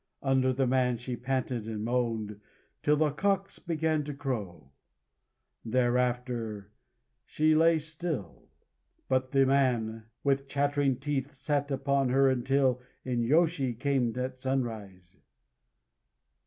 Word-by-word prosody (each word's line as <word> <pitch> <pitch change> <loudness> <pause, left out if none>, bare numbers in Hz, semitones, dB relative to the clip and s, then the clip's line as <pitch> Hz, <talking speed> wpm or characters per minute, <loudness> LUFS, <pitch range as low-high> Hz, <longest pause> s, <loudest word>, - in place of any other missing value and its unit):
Under 130 -1 +3
the 130 +1 +1
man 125 -1 +2
she 125 +2 -5
panted 125 -2 -2
and 110 -2 -4
moaned 115 -4 -1 0.4
till 150 - +3
the 155 -1 +2
cocks 195 +5 -1
began 160 -3 0
to 145 -1 -5
crow. 105 - -5 0.9
Thereafter 120 -3 -1 0.5
she 155 +1 +2
lay 165 +1 +5
still. 155 - -5 0.6
But 130 0 +1
the 135 0 +4
man, 120 -5 +1 0.2
with 140 0 +1
chattering 145 -1 +1
teeth, 140 0 -2
sat 145 +1 -1
upon 140 -1 +1
her 135 +1 +4
until 130 0 +1 0.2
the 125 -1 -2
inyôshi 135 0 +2
came 130 -4 0
at 130 0 -3
sunrise. 110 -9 -4
130 Hz, 115 wpm, -29 LUFS, 120-140 Hz, 0.9 s, lay